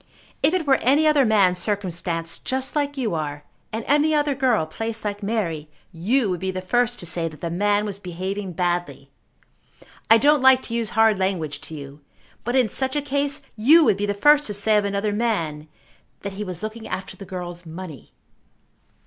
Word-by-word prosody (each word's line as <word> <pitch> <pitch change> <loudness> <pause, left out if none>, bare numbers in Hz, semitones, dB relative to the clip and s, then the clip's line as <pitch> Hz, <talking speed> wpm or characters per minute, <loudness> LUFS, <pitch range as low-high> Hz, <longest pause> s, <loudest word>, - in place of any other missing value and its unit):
If 335 - +3
it 355 -4 -1
were 270 -2 +4
any 285 +5 +3
other 300 -3 +4
man 200 -5 +4
circumstanced 175 -4 -2
just 260 +2 -1
like 285 -1 -1
you 235 -7 -1
are, 150 -2 -4 0.3
and 220 +1 -4
any 300 +2 +3
other 295 -1 +1
girl 250 - +1
placed 225 +6 -5
like 205 0 -3
Mary, 180 -8 -2 0.2
you 210 +9 +1
would 180 - -2
be 190 - -3
the 185 0 -3
first 245 +6 0
to - - -7
say 165 0 -1
that 155 -2 -10
the 170 - -4
man 205 +3 +1
was 200 -2 -5
behaving 190 +1 -5
badly. 175 +1 -2 1.0
I 225 - +8
don't 290 +4 +4
like 260 0 +6
to 230 - -6
use 230 -2 -1
hard 220 -3 +4
language 165 -7 -2
to 160 - -7
you, 140 0 -10 0.4
but 240 +2 -2
in 255 -3 +4
such 260 +5 0
a 295 - +1
case 285 +1 -1
you 300 +9 +6
would 195 - +3
be 205 +1 -1
the 205 - -1
first 295 +7 +4
to 205 - -2
say 215 +2 +2
of 205 -1 +2
another 200 +1 -1
man 170 -10 -1 0.5
that 200 -1 -5
he 205 +2 -5
was 185 -1 -6
looking 220 +1 -6
after 190 - -5
the 200 - -10
girl's 180 -2 -7
money." 160 -5 -9
205 Hz, 200 wpm, -23 LUFS, 175-255 Hz, 1.0 s, I